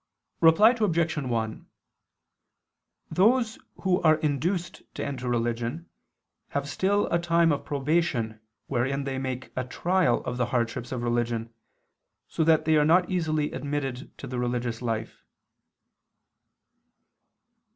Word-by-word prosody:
Reply 165 +8 +7
Obj. 170 -9 +1
1: 115 -6 -3 1.4
Those 225 +4 +3 0.2
who 185 -2 +2
are 155 -2 +5
induced 160 +4 -2
to - - -3
enter 130 -3 -4
religion 120 +6 -2 0.6
have 140 0 -3
still 200 +7 +1
a 170 - +3
time 170 -1 +3
of 145 - -1
probation 140 -6 0 0.3
wherein 135 +2 -1
they 135 -1 -3
make 130 -1 -4
a 130 - -1
trial 175 +2 +1
of 125 - -3
the 125 -1 0
hardships 120 0 -2
of 125 -2 -3
religion, 120 -1 -1 0.7
so 160 - -1
that 160 -1 +4
they 160 0 +4
are 150 - +4
not 175 +4 +4
easily 155 -4 0
admitted 140 -3 -4
to - - -8
the 125 -2 -4
religious 120 -1 -2
life. 115 - -4
140 Hz, 125 wpm, -27 LUFS, 120-170 Hz, 1.4 s, Reply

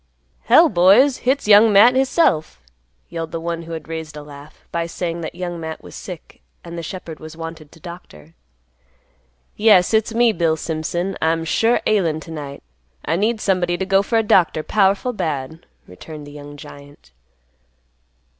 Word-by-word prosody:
"Hell, 315 +9 +6
boys! 205 - +5
Hit's 275 -3 0
Young 210 +1 +7
Matt 210 +5 +7
hisself!" 260 - +1 0.5
yelled 165 -1 -5
the 165 - -4
one 170 0 -4
who 165 0 -8
had 160 -2 -7
raised 160 -2 -7
a 150 - -8
laugh, 145 0 -14
by 170 0 -2
saying 170 0 -4
that 160 - -6
Young 175 -1 -5
Matt 160 -1 -7
was - - -12
sick 180 -4 -10 0.2
and 170 0 -9
the 170 - -5
shepherd 165 -1 -8
was 155 0 -11
wanted 165 -2 -8
to 165 - -17
doctor. 160 - -12 1.2
"Yes! 210 -3 +4
It's 220 0 +2
me, 235 0 +4
Bill 165 -3 +1
Simpson. 170 +4 -3
I'm 165 0 0
sure 225 +8 +2
ailin' 170 -7 +1
to 165 - -11
night. 145 -3 -8 0.4
I 160 - 0
need 215 +5 0
somebody 180 -3 0
to 190 - -2
go 195 0 +3
for 225 +3 -1
a 225 - +2
doctor 175 -6 +2
powerful 200 +6 +1
bad," 160 - -4 0.2
returned 150 - -11
the 145 - -11
young 145 0 -11
giant. 145 - -14
170 Hz, 170 wpm, -20 LUFS, 155-200 Hz, 1.2 s, Young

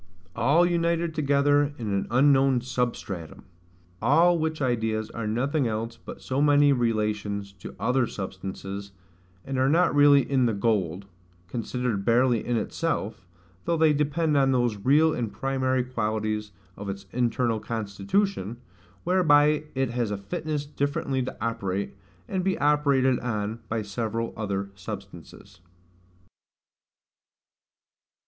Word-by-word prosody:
all 140 +9 +4
united 170 -1 0
together 145 0 +2
in 115 -3 -4
an 100 - -1
unknown 135 +1 +4
SUBSTRATUM: 120 - -4 0.6
all 165 +8 +4
which 160 0 -2
ideas 110 -4 -1
are 115 -2 -4
nothing 130 +5 0
else 115 +1 -3
but 115 - -11
so 135 +2 -1
many 145 -1 +5
relations 105 -4 -1
to 95 - -10
other 125 -1 +1
substances; 95 0 -6 0.5
and 135 -1 -2
are 130 +1 +3
not 170 +4 +3
really 145 -1 +6
in 130 -3 +2
the 115 - 0
gold, 100 -4 0 0.4
considered 115 0 -2
barely 120 +1 +3
in 120 -1 0
itself, 110 - -3 0.4
though 170 - +1
they 160 -1 +4
depend 150 +2 0
on 135 -1 +4
those 120 -4 +1
real 155 +4 +4
and 115 -4 -3
primary 130 +3 0
qualities 110 -3 -2 0.2
of 100 0 -7
its 100 0 -6
internal 120 -1 0
constitution, 110 - -2 0.5
whereby 150 -4 +4
it 135 -2 0
has 120 -2 -1
a 105 - -2
fitness 145 +9 -4
differently 140 -2 -2
to 125 - -5
operate, 100 -4 -3 0.3
and 185 -1 -2
be 190 0 0
operated 140 -3 +3
on 110 -2 -3
by 110 -1 -1
several 115 +3 -3
other 100 -2 -3
substances. 95 0 -10
125 Hz, 125 wpm, -26 LUFS, 105-145 Hz, 0.6 s, really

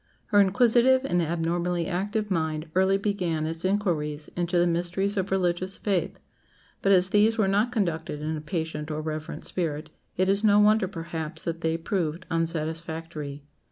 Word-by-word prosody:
Her 205 - +5
inquisitive 245 +6 +4
and 175 -9 +1
abnormally 170 +1 -1
active 205 +4 -2
mind 160 -2 -1
early 190 +1 +3
began 180 -6 -1
its 165 +1 -4
inquiries 165 -7 -1
into 175 0 0
the 175 - +4
mysteries 175 +4 0
of 190 -1 -1
religious 185 0 0
faith, 195 -4 -1 0.6
but 195 - +3
as 185 -1 +4
these 215 +2 +4
were 215 -3 +3
not 205 +5 +2
conducted 165 -9 -1
in 155 +1 -2
a 155 - -5
patient 160 -1 -4
or 155 0 -3
reverent 155 0 -5
spirit, 155 -3 -3 0.3
it 185 +1 +2
is 200 +2 +2
no 205 -1 +5
wonder, 210 -1 +4
perhaps, 165 -3 -6
that 165 0 -3
they 165 0 0
proved 170 0 -2
unsatisfactory. 160 -2 -3
175 Hz, 160 wpm, -26 LUFS, 160-195 Hz, 0.6 s, Her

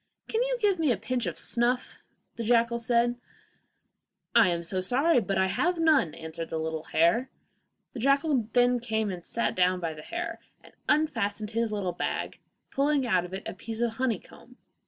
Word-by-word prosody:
'Can 450 - 0
you - - 0
give 405 -5 +2
me 310 -5 +3
a 230 - +1
pinch 230 +1 -2
of 170 - -4
snuff?' 245 +2 0
said - - -44
the 230 - -3
jackal. 235 +1 +2
'I 240 0 +2 1.3
am 170 -1 -1
so 185 +2 -1
sorry, 265 - +3
but 195 -3 -2
I 190 - +3
have 350 - 0
none,' 310 - +3
answered 160 0 -6
the 160 - -3
little 160 0 -3
hare. 175 +11 +2 0.6
The 250 - -6
jackal 275 -1 +2
then 245 0 +4
came 220 -3 -1
and 175 -2 -7
sat 235 - -1
down 185 0 +2
by 170 -2 -2
the 155 - -10
little 150 - -11
hare, 335 -1 -4 0.2
and - - -17 0.2
unfastened 225 -9 +1
his 230 0 0
little 195 -4 -2
bag, - - -3 0.3
pulling 280 -1 +1
out 185 -6 +2
of 180 - -10
it 195 - -7
a - - -4
piece 225 0 -6
of 230 -1 -1
honeycomb. 250 0 -4
235 Hz, 190 wpm, -28 LUFS, 185-260 Hz, 1.3 s, then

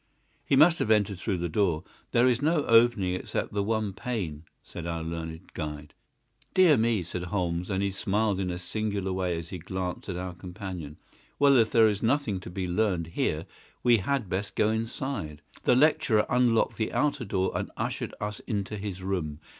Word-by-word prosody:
"He - - +2
must 160 +5 +6
have - - 0
entered 105 -3 +2
through 95 -1 -1
the 85 0 -2
door. 85 -2 +1 0.3
There 120 +2 +4
is 125 -1 +2
no 155 0 +2
opening 115 -5 +4
except 90 - -3
the 100 - +1
one 110 -1 -1
pane," 95 - -4 0.2
said 85 -1 -7
our 85 -1 -3
learned 80 +1 -6
guide. 75 -2 -6 0.6
"Dear 180 -5 +7
me!" 115 -4 +2
said 90 +1 -5
Holmes, 90 -1 -2
and 95 -1 0
he 100 - 0
smiled 100 +1 0
in 95 -2 -1
a 90 - -3
singular 100 +1 -2
way 90 -2 -1
as 85 0 -6
he 90 - -6
glanced 95 +2 -4
at 90 - -3
our 90 0 -4
companion. 90 -4 -7 0.4
"Well, 140 -1 +5
if 115 -3 +5
there 115 -2 +6
is 105 -2 0
nothing 115 -5 +1
to 90 - -9
be 90 +1 -3
learned 90 -3 0
here - - 0 0.4
we 120 -1 +6
had 120 +3 -1
best 95 +3 -3
go 110 0 +3
inside." 110 - -3 0.2
The - - +5
lecturer 145 -6 +4
unlocked 120 -2 +3
the 110 - -1
outer 145 -3 +1
door 95 -3 0
and - - -2
ushered - - -3
us 105 0 -4
into 105 -2 -2
his 95 -2 -5
room. 85 -6 -2
100 Hz, 190 wpm, -28 LUFS, 90-115 Hz, 0.6 s, Dear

